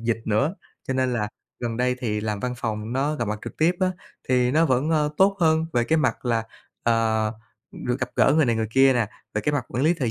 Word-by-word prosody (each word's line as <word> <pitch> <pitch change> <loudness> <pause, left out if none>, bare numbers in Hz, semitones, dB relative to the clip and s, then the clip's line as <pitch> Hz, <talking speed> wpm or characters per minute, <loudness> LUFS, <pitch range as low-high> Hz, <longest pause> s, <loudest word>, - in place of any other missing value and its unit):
dịch 115 -1 0
nữa, 135 - +1 0.3
cho 130 - 0
nên 130 -1 +1
là 105 -3 -1 0.3
gần 120 -2 -3
đây 125 +1 +1
thì 105 -3 -1
làm 105 -1 -3
văn 125 0 -2
phòng, 110 0 -3
nó 140 +4 0
gặp 120 -7 -2
mặt 105 0 -2
trực - - -7
tiếp 160 +3 +3
á, 185 -1 +3 0.4
thì 125 -1 +3
nó 160 +4 +3
vẫn, 135 +3 +1
ơ, 150 -2 +2
tốt 195 +1 +4
hơn 160 -1 +3
về 120 -1 +2
cái 160 +6 +2
mặt 155 - 0
là, 115 -2 +1 0.4
ờ, 110 -2 +1 0.4
được 125 +2 -3
gặp 130 -1 -2
gỡ - - +5
người 160 - +5
này 115 -2 +2
người 110 -1 -1
kia 135 +2 +5
nè, 120 -4 +1 0.3
về 105 - +1
cái 150 - 0
mặt 140 -5 -1
quản 125 +4 -1
lý 165 +3 +4
thời 130 -9 -1
125 Hz, 250 wpm, -24 LUFS, 115-150 Hz, 0.4 s, gỡ